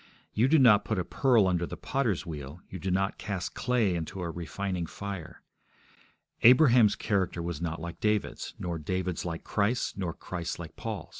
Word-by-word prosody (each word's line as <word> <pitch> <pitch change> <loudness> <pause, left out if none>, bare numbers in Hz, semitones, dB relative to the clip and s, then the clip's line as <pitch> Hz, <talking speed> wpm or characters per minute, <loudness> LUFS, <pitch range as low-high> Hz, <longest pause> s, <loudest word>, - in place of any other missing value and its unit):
You 115 +4 +3
do 160 +4 +5
not 115 -7 +6
put 110 -1 -2
a 90 - -1
pearl 120 -3 +3
under 90 -2 0
the - - -7
potter's 115 -10 -1
wheel; 75 -1 -7
you 95 - -6
do 95 - -3
not 95 +2 0
cast 95 -4 -4
clay 120 -7 +1
into 85 +2 -4
a 85 - -3
refining 85 +1 -3
fire. 95 -4 -7 1.0
Abraham's 125 -4 +7
character 95 -4 -1
was 85 -2 -4
not 80 -2 -3
like 85 +1 -7
David's, 105 -1 -1
nor 85 -2 -3
David's 90 +2 -2
like 85 -2 -4
Christ's, 110 +4 0
nor 90 -4 -3
Christ's 85 -2 -5
like 85 -2 -9
Paul's. - - -5
95 Hz, 175 wpm, -29 LUFS, 85-105 Hz, 1.0 s, Abraham's